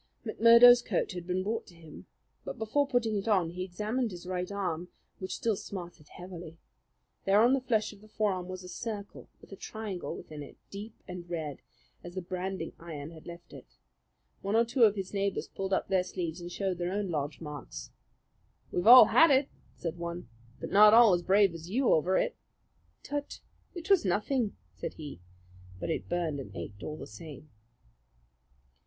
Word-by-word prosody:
McMurdo's 235 +1 +8
coat - - -1
had 180 -1 -7
been 185 +1 0
brought 220 +3 -3
to 175 - -16
him; 160 -2 -13 0.4
but - - -6
before 250 +6 +1
putting 245 -5 +1
it 200 - -4
on 185 -6 +2
he 180 +1 -4
examined 215 +7 -2
his 180 -2 -9
right 180 +1 -3
arm, 180 -4 -2 0.3
which 185 - -4
still 225 -2 0
smarted 175 -6 -8
heavily. 175 -2 -10 0.7
There 195 +1 +5
on 240 +4 +5
the 270 - +2
flesh 220 -4 0
of 200 - -17
the 215 - -16
forearm 200 -4 -1
was 185 0 -7
a - - -9
circle 205 +2 -6
with - - -18
a - - -7
triangle 205 -2 -5
within 150 -1 -9
it, 145 - -11
deep 210 +3 -8
and 180 -1 -8
red, 155 -5 -4 0.4
as 175 +1 -9
the 185 - -2
branding 185 -1 -4
iron 160 -2 -7
had 160 -2 -13
left 170 0 -11
it. - - -14 0.6
One 200 +2 -1
or 230 +1 +5
two 235 0 +4
of 210 -1 +3
his 195 -1 -5
neighbours 200 -1 -1
pulled 195 0 -5
up 190 - +1
their 190 -1 +2
sleeves 175 -2 -5
and 175 0 -7
showed 190 -2 -2
their 175 +1 -1
own 200 -2 -2
lodge 145 -2 -3
marks. 150 -3 -8 0.8
"We've 175 +3 -1
all 250 +2 +12
had 325 - +6
it," 270 0 +3 0.3
said 170 0 -5
one; 170 -5 -5 0.3
"but - - -6
not 210 +2 +8
all 230 -4 +8
as 175 - +2
brave 195 0 +4
as 165 +1 -9
you 250 +5 +1
over 175 +4 +2
it." - - 0 0.7
"Tut! 290 0 -4 0.4
It 345 +2 -4
was 390 - +6
nothing," 210 +5 0 0.2
said - - -6
he; 145 - -9 0.6
but 165 - -3
it - - -3
burned 165 -5 -1
and 130 - -7
ached 100 +5 -7
all 155 - -5
the - - -7
same. 150 +5 -11
185 Hz, 190 wpm, -30 LUFS, 170-215 Hz, 0.8 s, all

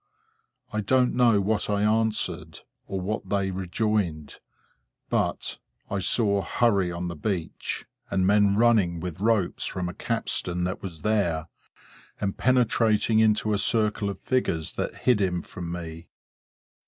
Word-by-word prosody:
I 110 - 0
don't 125 +4 +2
know 120 -4 +4
what 105 +2 0
I 100 0 +1
answered, 110 0 0 0.3
or 95 - -3
what 105 +4 -3
they 100 -1 0
rejoined; 95 -4 -2 0.7
but, - - -1 0.3
I 100 - 0
saw 100 +1 +2
hurry 100 -5 +1
on 85 +1 -4
the 85 - -5
beach, 85 +1 -3 0.2
and 95 -1 +1
men 100 0 +4
running 105 -7 +3
with 90 -1 -5
ropes 105 -4 +1
from 90 -1 -3
a 90 - -5
capstan 90 0 -2
that 90 +1 -2
was 85 -5 -7
there, 85 -7 0 0.7
and 100 -1 -1
penetrating 115 -3 +3
into 110 -1 +3
a 100 - +1
circle 105 -1 +1
of 100 - -6
figures 85 -11 -1
that - - -3
hid 120 -5 +4
him 90 -3 0
from 85 -1 -7
me. 85 -1 -7
100 Hz, 140 wpm, -26 LUFS, 90-110 Hz, 0.7 s, know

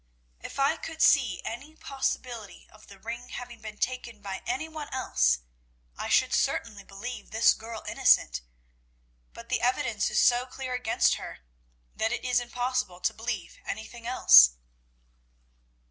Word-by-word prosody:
If - - -9
I 280 +4 +2
could 320 0 -8
see 250 -12 +4
any 275 +7 -7
possibility 250 -7 -4
of 215 - -18
the 200 - -13
ring 235 +4 -7
having 245 -2 -8
been 215 -1 -8
taken 245 -3 -3
by 195 -2 -6
any 360 -3 -2
one 310 -2 -7
else, 60 - +1 0.5
I - - -5
should - - +3
certainly 210 -3 0
believe 215 +5 -8
this 220 +1 +4
girl 225 0 -8
innocent, - - +3 0.9
but - - -12
the - - 0
evidence 235 -4 0
is - - +1
so 245 +1 +4
clear 260 0 -6
against 250 -3 +2
her, - - -8 0.5
that 220 - 0
it 245 - -3
is 250 -1 +3
impossible 245 -5 -2
to - - +1
believe 225 -6 -5
anything 230 +2 -7
else." 65 - +8
240 Hz, 145 wpm, -28 LUFS, 210-255 Hz, 0.9 s, else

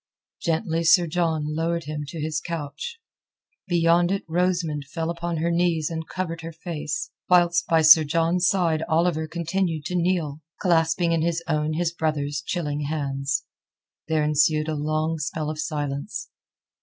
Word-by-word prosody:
Gently 165 0 0
Sir 175 +1 +6
John 160 -3 -1
lowered 170 +1 -1
him 150 -1 -5
to 165 +3 -7
his 155 0 -2
couch. 170 - -5 0.7
Beyond 175 0 +3
it 195 - -1
Rosamund 170 -3 0
fell 165 +3 -3
upon 170 0 -3
her 170 +2 0
knees 170 -2 +1
and 160 -1 -4
covered 165 -3 -4
her 165 +1 -6
face, 170 - -4 0.2
whilst 175 -1 +4
by 165 -1 +3
Sir 155 +1 +9
John's 165 +3 +2
side 170 -5 +2
Oliver 160 -1 +1
continued 170 -1 -2
to 180 - -3
kneel, 170 -4 0 0.2
clasping 170 -1 +2
in 165 -1 +2
his 170 0 0
own 155 -1 0
his 170 +1 0
brother's 145 -3 -1
chilling 150 -5 -2
hands. 140 -1 -1 0.6
There 155 -1 +1
ensued 155 +1 +2
a 155 - -1
long 155 +2 -1
spell 155 0 -2
of 155 - -7
silence. 145 -3 -3
165 Hz, 155 wpm, -24 LUFS, 155-170 Hz, 0.7 s, Sir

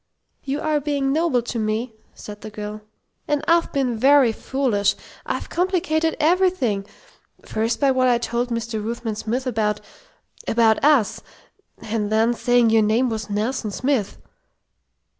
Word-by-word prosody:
"You 280 +1 -3
are 310 -1 +1
being 280 -1 -1
noble 310 -6 +1
to 235 0 -4
me," 220 +2 -2 0.2
said 210 0 -10
the - - -7
girl, 210 0 -7 0.5
"and 295 +1 -1
I've 335 0 +3
been 255 -5 -1
very 270 -1 +5
foolish. 225 -4 0 0.3
I've - - -3
complicated 325 -3 0
everything. 310 - +1 0.6
First, 225 +2 -1
by 275 -2 +3
what 255 -1 +2
I 245 -1 +4
told 235 +1 -2
Mr. 230 -2 -3
Ruthven 230 0 -3
Smith 235 +5 -3
about 215 -4 0 0.7
about 225 0 +3
us. 285 -8 +3 0.6
And 215 -1 -2
then 225 +2 +3
saying 245 -1 +3
your 225 0 +5
name 225 +4 +2
was 220 -1 -4
Nelson 215 +3 -2
Smith." 250 -1 -1
240 Hz, 140 wpm, -22 LUFS, 220-280 Hz, 0.7 s, very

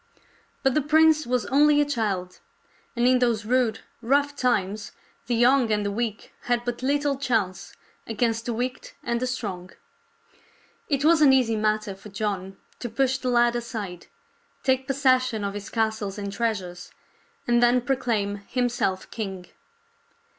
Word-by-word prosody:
But 270 -1 +3
the 305 - +2
prince 310 0 +4
was 245 -3 0
only 295 +2 +5
a 295 - +4
child, 205 -10 -2 0.6
and 240 0 +1
in 255 0 +4
those 230 -4 +1
rude, 235 -2 +1 0.2
rough 285 +4 +1
times 210 -6 -1 0.3
the 240 - +1
young 245 0 +4
and 210 -1 +1
the 200 - -1
weak 220 0 -4
had 240 0 0
but 245 0 -3
little 285 +1 +1
chance 220 -9 -1 0.3
against 225 0 -1
the 240 - -1
wicked 250 +3 -4
and 235 0 -1
the 255 - -1
strong. 200 -8 -4 1.2
It 280 -1 0
was 325 0 +5
an 285 -3 +7
easy 250 -4 +3
matter 215 -1 0
for 195 +2 -13
John 195 -2 -4 0.2
to 240 - -4
push 260 +3 0
the 255 - -2
lad 240 -1 +3
aside, 215 -7 -5 0.6
take 260 0 +1
possession 255 -5 +2
of 200 0 -2
his 205 0 -7
castles 220 -3 -1
and 200 -1 -5
treasures, 195 -6 -3 0.6
and 240 0 +3
then 245 +1 +5
proclaim 230 -5 -1
himself 245 -6 -1
king. 190 -5 -6
235 Hz, 155 wpm, -25 LUFS, 210-255 Hz, 1.2 s, an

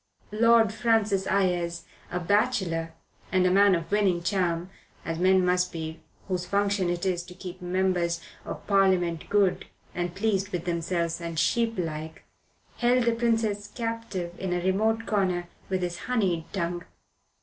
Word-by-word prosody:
Lord 225 0 +4
Francis 215 -4 +1
Ayres, 175 -3 0 0.3
a 180 - -1
bachelor 175 -4 +1 0.4
and 185 0 +3
a 180 - +4
man 200 0 +6
of 165 +1 -4
winning 195 -4 +2
charm, 180 -2 0 0.3
as 165 0 -3
men 185 0 +4
must 180 0 +2
be 160 -1 -5 0.3
whose 180 -2 -1
function 200 -1 +1
it 175 +1 -2
is 180 -2 0
to 180 0 -12
keep 185 0 -8
Members 180 -1 0 0.2
of - - -7
Parliament 185 -4 +2
good 200 -3 +2 0.3
and 175 0 -3
pleased 195 -1 0
with 175 -4 -4
themselves 170 0 -1
and 170 -1 -5
sheeplike, 165 -8 -1 0.5
held 245 0 +3
the 235 0 +2
Princess 225 -3 0
captive, 225 -6 -4
in 185 -2 -2
a 175 0 -1
remote 220 +4 +1
corner, 185 -4 0 0.2
with 185 -1 -1
his 175 -1 -3
honeyed 190 -10 0
tongue. 175 -2 -2
185 Hz, 150 wpm, -27 LUFS, 175-205 Hz, 0.5 s, man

